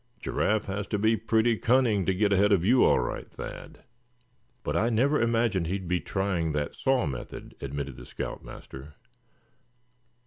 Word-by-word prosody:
Giraffe 110 0 0
has 100 +1 -4
to 105 - -1
be 110 +2 +3
pretty 115 +1 +2
cunning 115 -6 +2
to 95 - +3
get 100 +1 +2
ahead 100 +2 +4
of 95 -3 +3
you, 125 +4 +5
all - - +5
right, - - -4
Thad." - - -9 0.8
"But 75 - -2
I 110 +7 +2
never 130 +6 +2
imagined 115 -6 +1
he'd 95 +1 -3
be 90 0 +1
trying 90 -6 -1
that 75 -1 -2
saw 135 -5 +1
method," 65 -5 -6
admitted 70 -1 -5
the - - -10
scout - - -6
master. 70 +3 -11
100 Hz, 165 wpm, -28 LUFS, 85-115 Hz, 0.8 s, you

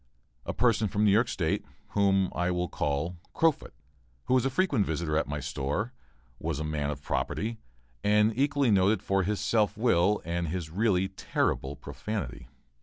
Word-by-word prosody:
A - - 0
person 115 -2 +2
from 105 +2 +1
New 100 - +5
York 110 +5 +4
State, 80 -4 -1 0.3
whom 95 -2 +2
I 90 0 0
will 90 0 0
call 80 +2 -2 0.2
Crofut, 165 -2 +2 0.5
who - - 0
was 130 0 +3
a - - +3
frequent 135 - +2
visitor 80 -2 -2
at 80 - +1
my 75 +1 -3
store, 75 - -2 0.5
was 80 -2 -2
a - - -2
man 75 -2 -2
of 70 -1 -5
property, 110 +2 -2 0.4
and 105 +1 +4
equally 140 -1 +2
noted 100 +2 +3
for 95 0 +2
his 100 +1 -1
self 105 0 +1
will 105 -3 +3
and 85 +1 -1
his 80 -1 -4
really 95 -1 +2
terrible 70 -7 -1
profanity. 95 - -5
95 Hz, 170 wpm, -29 LUFS, 80-110 Hz, 0.5 s, New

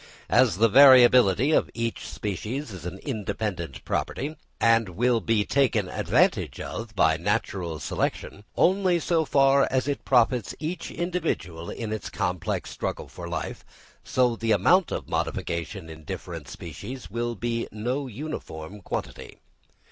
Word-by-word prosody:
As 85 - +4
the 115 +3 +5
variability 125 -1 +7
of - - +3
each 115 -1 -3
species 110 +6 -4
is 90 -3 -7
an 90 +2 -6
independent 100 - -4
property, 145 +4 -2 0.2
and 115 -2 +3
will 115 +6 +2
be 110 -2 +1
taken 120 -8 +2
advantage - - +1
of 115 -2 -6
by 80 -4 +3
natural 90 -3 -2
selection, 100 +5 -3
only 185 -1 +3
so 165 -1 +1
far 135 -1 +4
as 130 0 0
it 145 - -2
profits 125 -3 +2
each 165 +3 -4
individual 160 - -3
in 110 -2 -4
its 110 - -5
complex 90 -2 -2
struggle - - -4
for - - -8
life, - - -4 0.4
so 125 -2 +2
the 115 -1 +1
amount 185 -1 +4
of - - -4
modification 85 +2 -3
in 80 -1 -11
different - - -7
species 100 - -8
will 120 0 -2
be 115 +3 -2
no 125 +6 -2
uniform 105 - -7
quantity. - - -6
115 Hz, 140 wpm, -26 LUFS, 95-135 Hz, 0.4 s, variability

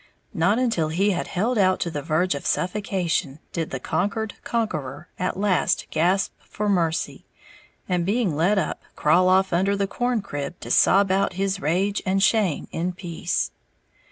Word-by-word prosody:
Not 190 +7 +2
until 230 -11 +1
he 195 +6 +2
had 175 - -2
held 220 +5 0
out 185 -1 +3
to 170 - -1
the 145 - -3
verge 165 +5 +1
of 140 - -5
suffocation 180 -6 -1 0.2
did 165 -2 -2
the 135 - -4
conquered 205 - -1
conqueror 165 - -3
at 185 0 -1
last 195 -2 +1
gasp 180 +5 +1
for 210 - -4
mercy, 170 -4 0 0.6
and 180 -2 0
being 200 -3 0
let 180 +7 +2
up, 175 - -1
crawl 180 +5 +4
off 190 0 +3
under 190 +4 +2
the 200 0 0
corncrib 200 - -3
to - - -6
sob 195 -1 +5
out 190 0 +1
his 195 +1 -1
rage 190 +7 0
and 195 +1 +1
shame 205 -7 +2
in 175 +2 -2
peace. 175 -1 -2
185 Hz, 160 wpm, -24 LUFS, 165-200 Hz, 0.6 s, sob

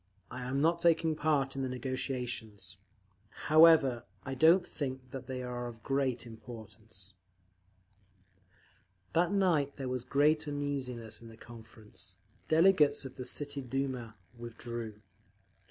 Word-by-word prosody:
I 125 - -6
am 135 +2 -1
not 165 +2 +3
taking 165 -2 +3
part 145 -3 +1
in 135 - -2
the 130 - -1
negotiations…. 125 -7 -4 0.7
However, 155 -7 +7 0.2
I 135 - -3
don't 165 +7 +5
think 130 -5 -5
that 135 -2 -7
they 130 -1 -4
are 120 -1 -4
of 115 -2 -10
great 135 -3 0
importance…." 110 -3 -10 2.0
That 175 +1 +3
night 170 -8 +2
there 135 -2 -4
was 125 -1 -2
great 150 +4 +2
uneasiness 130 -6 -4
in 115 - -11
the 115 0 -13
Conference. 110 -2 -12 0.3
The 155 - +2
delegates 160 -5 +5
of 130 - -8
the 125 -1 -6
City 145 +2 -2
Duma 130 -3 -3 0.2
withdrew…. 115 -2 -7
130 Hz, 130 wpm, -32 LUFS, 120-145 Hz, 2.0 s, However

